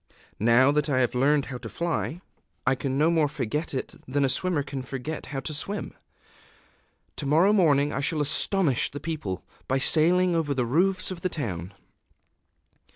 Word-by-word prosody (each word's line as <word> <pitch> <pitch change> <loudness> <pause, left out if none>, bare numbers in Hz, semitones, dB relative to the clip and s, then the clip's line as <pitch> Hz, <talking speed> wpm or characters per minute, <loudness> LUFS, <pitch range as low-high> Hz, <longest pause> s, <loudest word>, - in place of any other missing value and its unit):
_... - - -29 0.3
Now 120 +5 +5
that 150 0 0
I 135 - +1
have 125 -2 +2
learned 140 +3 +2
how 130 -3 -6
to 115 -2 -8
fly, 170 +2 -3 0.4
I 135 - +4
can 135 +1 -2
no 155 +3 +3
more 160 -3 +3
forget 145 +3 -3
it 130 - -4
than 140 +2 +1
a - - +1
swimmer 160 +2 0
can 140 -1 -5
forget 135 +4 -6
how 135 -2 -4
to 155 - -5
swim. 200 +8 -4 1.2
To 145 - -4
morrow 170 +8 +4
morning 150 -7 +3
I - - -2
shall 150 +3 0
astonish 150 - +2
the 145 - -7
people, 145 - -4 0.2
by 135 - +1
sailing 175 +6 +3
over 155 -4 0
the 125 -2 0
roofs 185 +9 +1
of 175 -2 -7
the 185 - -1
town." 95 - -4
145 Hz, 180 wpm, -26 LUFS, 130-165 Hz, 1.2 s, Now